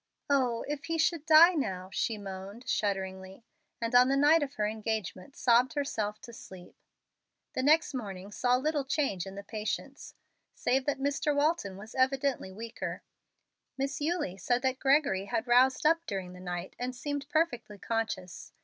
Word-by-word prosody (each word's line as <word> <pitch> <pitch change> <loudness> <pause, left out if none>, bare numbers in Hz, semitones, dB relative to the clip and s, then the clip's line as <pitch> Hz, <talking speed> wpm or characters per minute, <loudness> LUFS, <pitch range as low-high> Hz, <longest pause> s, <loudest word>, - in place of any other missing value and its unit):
"Oh, 250 -4 +1
if 290 0 -4
he 330 0 -1
should 325 -1 +1
die 325 +3 +8
now!" 190 - -3
she 225 - -1
moaned, 200 +4 -8
shudderingly, 190 -2 -2 0.4
and 230 +1 -3
on 250 +1 +7
the 275 +1 +2
night 300 +3 +5
of 285 0 -3
her 210 - 0
engagement 215 0 -4
sobbed 245 +1 +3
herself 215 -8 -2
to 235 - -11
sleep. 185 -5 -12 0.8
The - - -1
next 310 +4 +4
morning 200 -5 -6
saw 245 +4 +2
little 295 +2 0
change 270 - -1
in 195 - -8
the 200 - -7
patients, 215 +1 -5 0.4
save 260 +2 0
that 290 - +1
Mr. 285 +2 0
Walton 285 - 0
was 215 +3 -11
evidently 265 -5 0
weaker. 225 +4 -6 0.7
Miss 275 +2 -2
Eulie 300 - -1
said 245 +6 0
that 260 0 0
Gregory 270 -9 +2
had 210 +3 -2
roused 255 +3 +4
up 330 +2 +4
during 190 -2 -4
the 180 - -11
night 180 0 -5
and 250 +1 -3
seemed 285 +2 -4
perfectly 245 -10 -1
conscious. 225 -4 -4
245 Hz, 165 wpm, -30 LUFS, 200-285 Hz, 0.8 s, die